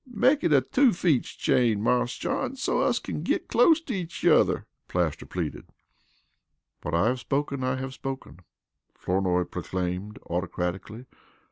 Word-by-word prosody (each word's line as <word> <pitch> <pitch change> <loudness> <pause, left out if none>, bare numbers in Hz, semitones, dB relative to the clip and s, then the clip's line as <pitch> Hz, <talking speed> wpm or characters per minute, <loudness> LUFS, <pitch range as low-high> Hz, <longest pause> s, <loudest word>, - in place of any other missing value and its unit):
"Make 260 +6 +3
it 170 - +2
a 140 -3 +6
two 250 - +3
feets 165 -7 +1
chain, 115 -5 +2
Marse 125 +3 +1
John, 260 -1 -2
so 270 - 0
us - - +2
kin - - -4
git - - -1
clost 330 -1 +4
to 250 - -3
each 175 -4 -5
yuther," - - +4 0.2
Plaster 85 -4 -1
pleaded. - - -4 1.1
"What - - -2
I 85 - +3
have 125 +1 -1
spoken 140 0 -2
I 130 0 0
have 130 0 -5
spoken," 135 -8 -6 0.6
Flournoy 90 -1 +1
proclaimed 90 +4 -4
autocratically. 90 +6 -3
125 Hz, 145 wpm, -27 LUFS, -, 1.1 s, a